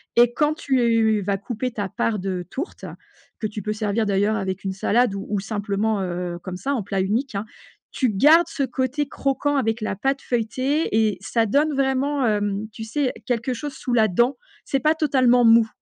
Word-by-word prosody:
et 240 0 +5
quand 300 +2 +1
tu 230 -7 +2
vas 200 0 -1
couper 240 +5 -4
ta 205 -3 -3
part 215 +4 -1
de 185 -1 -3
tourte, 295 - -6 0.5
que - - -3
tu 210 0 -6
peux 210 +2 -3
servir 215 +1 -1
d'ailleurs 205 +2 +2
avec 190 -2 -3
une 190 -1 -2
salade 220 +4 +2
ou 195 0 -5
ou 205 -2 0
simplement, 205 +1 -1
heu, 180 -1 -3
comme 185 -1 -5
ça 275 +9 -2
en 255 - -1
plat 195 0 -1
unique, 225 +6 -1
hein. 200 +2 -2 0.5
Tu 255 - +1
gardes 305 - +6
ce 295 -4 -5
côté 265 +3 -1
croquant 280 +1 -1
avec 225 -3 0
la 215 -2 -2
pâte 270 +7 -1
feuilletée 255 +4 -1
et 220 -2 +2
ça 225 +3 0
donne 295 +8 +2
vraiment, 275 +1 0
hem, 205 0 -1
tu 220 +1 -8
sais 260 +4 -1
quelque 245 0 -1
chose 290 +4 -5
sous 250 - -4
la 220 -2 +4
dent, 240 +8 +1 0.3
c'est 275 - -1
pas 305 +3 +3
totalement 260 -6 +3
mou. 230 -1 +6
225 Hz, 195 wpm, -23 LUFS, 205-265 Hz, 0.5 s, gardes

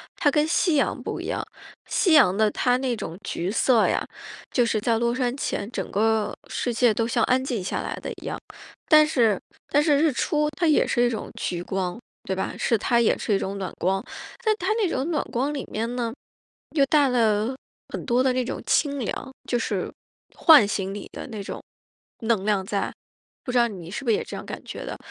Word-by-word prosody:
它 295 - +3
跟 300 +1 +2
夕 335 0 +2
阳 280 - +1
不 - - -4
一 - - -6
样。 - - -2 0.4
夕 360 -6 +2
阳 250 -12 +6
的 215 +1 +3
它 245 +3 +2
那 255 -2 -1
种 170 -6 -6
橘 180 +3 -2
色 230 +1 +3
呀， - - 0 0.5
就 245 - +3
是 220 -1 +1
在 225 +2 +1
落 235 0 +1
山 250 0 -1
前 210 -6 -3
整 - - -4
个 220 +1 +1
世 245 - -2
界 235 -1 +4
都 225 +2 0
像 240 0 +1
安 255 +1 +2
静 245 -7 -2
下 - - -2
来 - - -4
得 - - -5
一 - - -11
样。 - - -3 0.5
但 305 -1 +7
是 235 - +2 0.3
但 290 - +3
是 295 -2 +4
日 310 +1 +3
出 300 +4 +1
它 340 - +2
也 305 - +4
是 240 - +2
一 240 - +3
种 225 -3 -4
橘 175 -1 -2
光， 185 +1 -2 0.3
对 190 - -2
吧？ 190 - -3
是 230 - +2
它 235 +3 +2
也 230 - +3
是 215 - -1
一 195 - +2
种 195 +1 -3
暖 190 -2 -4
光。 190 +2 0 0.4
但 435 -2 +3
它 375 +4 +1
那 435 -5 +1
种 275 +1 -1
暖 300 - 0
光 270 +5 0
里 280 - -3
面 230 +3 -2
呢， 235 -2 -2 0.6
又 285 -3 +3
带 290 -2 +4
了 225 0 +2 0.3
很 - - -6
多 245 0 +2
的 260 -1 +2
那 255 0 0
种 240 - -5
清 285 -2 +1
凉， 260 +3 -4
就 245 - +1
是 200 -5 -2 0.5
唤 300 - +7
醒 195 -1 -2
你 205 - -7
的 - - -6
那 220 -5 -6
种 - - -6 0.6
能 225 -4 +1
量 205 -3 +1
在。 200 0 -1 0.5
不 250 - -2
知 250 - +1
道 240 -1 +5
你 180 -5 -9
是 210 - -5
不 245 - -2
是 - - +4
也 - - -2
这 - - -8
样 - - -7
感 - - -7
觉 - - -7
得。 - - -5
235 Hz, 240 characters per minute, -25 LUFS, 210-275 Hz, 0.6 s, 但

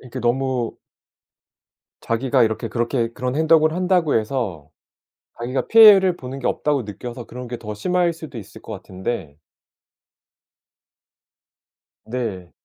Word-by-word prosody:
이렇게 130 0 -8
너무 125 0 -1 1.2
자기가 120 +3 +1
이렇게 110 -1 -2
그렇게 120 0 -1
그런 125 +1 -3
행동을 155 0 +4
한다고 180 -3 +1
해서 105 - -2 0.7
자기가 125 +3 -2
피해를 200 -5 +8
보는 130 -2 -7
게 130 - -1
없다고 145 -4 0
느껴서 120 +4 -8
그런 125 +1 -8
게 120 0 -5
더 105 -2 -7
심할 175 - 0
수도 155 -6 -9
있을 105 +2 -13
것 - - -10
같은데 95 -5 -5 2.7
네. 110 -7 -4
125 Hz, 255 characters per minute, -21 LUFS, 110-150 Hz, 2.7 s, 피해를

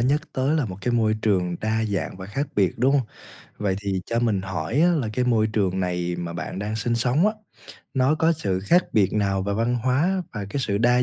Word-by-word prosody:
nhắc 140 +5 +2
tới 135 +4 +1
là 145 - +1
1 95 -4 -6
cái 120 +5 -1
môi 110 -2 +2
trường 90 -5 +1
đa 110 +1 0
dạng 100 -4 -2
và 95 0 -8
khác 135 +9 -2
biệt, 95 -4 +3
đúng 130 +3 +3
hông? 135 -5 +2 0.5
Vậy 100 -2 0
thì 100 -2 -2
cho 115 - 0
mình 105 -5 +1
hỏi 95 - -2
á 170 - +5
là 150 -10 0
cái 125 +3 0
môi 115 -3 +3
trường 100 -4 0
này 90 -1 -1
mà 85 -1 -4
bạn 85 +2 -5
đang 105 +2 -3
sinh 115 +2 0
sống 125 - +2
á, 215 - +2 0.6
nó 135 +2 +3
có 160 +1 +3
sự 100 - -1
khác 170 - +3
biệt 100 -3 +3
nào 100 -2 +1
về 100 - -2
văn 115 +3 +1
hóa 145 +11 +1
và 105 -3 -4
cái 140 - -2
sự 100 -5 0
đa 125 +2 +4
110 Hz, 240 wpm, -24 LUFS, 95-130 Hz, 0.6 s, á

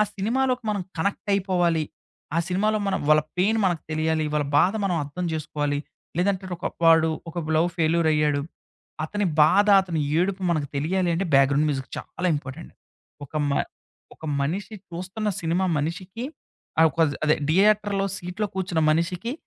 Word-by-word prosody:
సినిమాలోకి 250 +4 0
మనం 205 -2 -1 0.2
కనెక్టయిపోవాలి. 185 -3 0 0.5
ఆ - - +3
సినిమాలో 215 +4 +1
మనం 195 - 0
వాళ్ళ 155 0 +6 0.2
పెయిన్ 215 +5 +3
మనకు 175 -4 0
తెలియాలి. 155 0 0
వాళ్ళ 150 - +1
బాధ 185 - +4
మనం 180 -3 +1
అర్థం 160 +6 -5
జేసుకోవాలి. 145 -2 -2 0.4
లేదంటే 190 +1 +1
ఒక - - -4 0.2
వాడు, 160 0 +6 0.2
ఒక 170 - -10 0.2
లవ్ 170 +2 +3
ఫెల్యూరయ్యాడు. 155 -3 +2 0.6
అతని 205 +4 -1 0.2
బాధ, 200 +7 +5 0.2
అతని 170 -4 -2 0.2
ఏడుపు, 190 +1 0
మనకు 155 -4 0
తెలియాలింటే 175 +4 0
బాగ్రౌండ్ 140 +2 +4
మ్యూజిక్ 135 -2 -2
చాలా 180 - -5
ఇంపార్టెంట్. 145 +4 -8 0.5
ఒక 150 - -28 0.2
మ - - +1 0.6
ఒక - - -15 0.2
మనిషి 190 +9 -2
చూస్తున్న 185 +5 -4
సినిమా 170 +3 0
మనిషికి, 180 - -4 0.6
ఆ - - +8
కొది 160 -4 +2
అదే 155 - +4
థియేటర్‌లో 200 +2 +3
సీట్‌లో 180 +4 -3
కూర్చున్న 180 -3 -1
మనిషికి, 175 +8 -1
175 Hz, 140 wpm, -24 LUFS, 155-195 Hz, 0.6 s, ఆ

